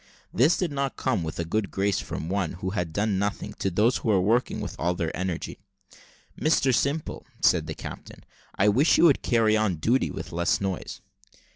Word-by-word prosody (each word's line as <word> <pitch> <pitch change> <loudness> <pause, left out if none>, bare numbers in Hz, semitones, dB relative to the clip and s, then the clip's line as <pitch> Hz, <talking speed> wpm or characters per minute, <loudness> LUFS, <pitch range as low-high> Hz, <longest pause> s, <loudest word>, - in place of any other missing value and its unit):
This 130 - +4
did 180 -4 -1
not 140 -2 -2
come 95 - 0
with 80 -1 -5
a 85 - -2
good 100 +4 -1
grace 100 0 0
from 80 - -5
one, 95 -2 -1
who 95 +2 -4
had 90 -5 -2
done 100 +2 0
nothing, 100 0 -3
to 95 - 0
those 105 +7 +2
who - - -6
were 100 -3 +4
working 115 +7 +1
with - - -5
all 90 +2 0
their 85 -2 -3
energy. 90 -2 -4 0.8
"Mr 140 -4 +2
Simple," 140 +5 -1 0.2
said 80 -3 +3
the 80 - -5
captain, - - -9 0.3
"I 100 - +2
wish 130 +10 +4
you - - +4
would 155 -5 +5
carry 115 -3 +2
on 110 -4 +1
duty 115 +12 +1
with - - -7
less 85 0 +1
noise." 95 -2 -4
100 Hz, 195 wpm, -26 LUFS, 90-120 Hz, 0.8 s, would